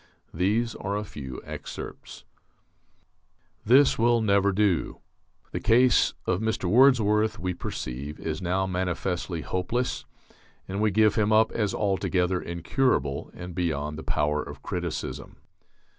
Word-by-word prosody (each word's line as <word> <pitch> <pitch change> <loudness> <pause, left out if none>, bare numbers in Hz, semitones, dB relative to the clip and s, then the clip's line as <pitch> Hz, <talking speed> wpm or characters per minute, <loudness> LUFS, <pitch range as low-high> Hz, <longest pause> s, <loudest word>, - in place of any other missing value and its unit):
These 105 +7 +1
are 100 +1 -3
a 105 - -3
few 65 -10 -8
excerpts: - - -8 1.4
This 130 +4 +5
will 120 +1 +4
never 100 -2 +3
do.... 100 -3 +1 0.5
The - - -3
case 125 +2 +4
of 90 - 0
Mr. 110 -2 -1
Wordsworth, 110 0 +4
we 90 -4 -2
perceive, 70 -2 -6
is 80 +3 -4
now 95 +2 0
manifestly 90 -2 -2
hopeless; 115 +10 -2 0.6
and 95 +2 -3
we 110 - +3
give 110 +1 +4
him 110 -1 +1
up 110 +1 +4
as 105 -4 -1
altogether 95 -3 0
incurable, 85 - -1
and 90 0 -8
beyond 75 -4 -2
the 80 - -6
power 75 0 0
of - - -9
criticism - - -4
95 Hz, 130 wpm, -26 LUFS, 85-110 Hz, 1.4 s, This